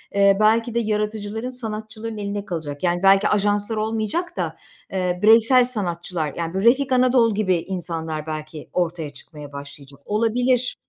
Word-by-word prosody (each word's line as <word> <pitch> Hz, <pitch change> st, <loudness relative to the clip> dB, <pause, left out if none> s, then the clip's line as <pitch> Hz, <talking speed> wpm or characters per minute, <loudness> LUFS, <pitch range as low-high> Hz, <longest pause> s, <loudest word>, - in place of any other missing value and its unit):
eee, 200 Hz, 0 st, +5 dB
belki 225 Hz, +2 st, +3 dB
de, 235 Hz, -, +3 dB
yaratıcıların, 215 Hz, +1 st, -2 dB
sanatçıların 220 Hz, -2 st, -6 dB
eline 205 Hz, 0 st, -4 dB
kalacak. 155 Hz, -4 st, -5 dB
Yani, 175 Hz, +1 st, 0 dB
belki, 195 Hz, +1 st, +5 dB
ajanslar 205 Hz, +1 st, +1 dB
olmayacak 220 Hz, -, -2 dB
da, -, -, -2 dB, 0.4 s
eee, 180 Hz, -2 st, -1 dB
bireysel 230 Hz, +4 st, +6 dB
sanatçılar, 175 Hz, -, -1 dB
yani, 165 Hz, 0 st, -3 dB
bu 190 Hz, -, -1 dB
Refik 260 Hz, +3 st, +3 dB
Anadol 250 Hz, -4 st, +3 dB
gibi 190 Hz, -4 st, +2 dB
insanlar 165 Hz, -3 st, -4 dB
belki 155 Hz, 0 st, -7 dB
ortaya 165 Hz, -4 st, -2 dB
çıkmaya 145 Hz, +1 st, -12 dB
başlayacak. 140 Hz, 0 st, -10 dB
Olabilir. 245 Hz, +4 st, +1 dB
205 Hz, 145 wpm, -22 LUFS, 170-225 Hz, 0.4 s, bireysel